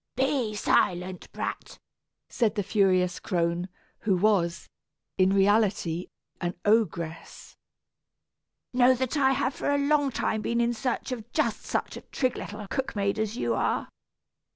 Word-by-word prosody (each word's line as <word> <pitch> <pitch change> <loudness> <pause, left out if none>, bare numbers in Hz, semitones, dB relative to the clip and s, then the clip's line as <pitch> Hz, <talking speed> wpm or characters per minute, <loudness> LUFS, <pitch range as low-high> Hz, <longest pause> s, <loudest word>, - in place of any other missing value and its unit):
"Be 260 -4 0
silent, 180 -2 0
brat," - - -5 0.5
said 225 -3 0
the 205 - 0
furious 185 -3 +2
crone, 170 +1 -1 0.3
who 200 -4 +1
was, 175 -4 +1 0.5
in 185 0 +5
reality, 195 -4 +2 0.3
an 175 0 -2
ogress. 170 -7 -1 1.2
"Know 250 +1 +5
that 260 +3 -2
I 270 -2 +4
have 265 0 0
for - - -3
a 285 - +3
long 285 0 +2
time 220 -3 -1
been 235 +2 -1
in 235 0 +2
search 240 +3 -2
of 235 -2 -6
just - - 0
such - - -2
a - - -8
trig 255 -2 -1
little 210 0 -6
cook 265 +3 -3
maid 200 +1 0
as 220 +1 -2
you - - 0
are. - - 0
215 Hz, 145 wpm, -27 LUFS, 185-250 Hz, 1.2 s, in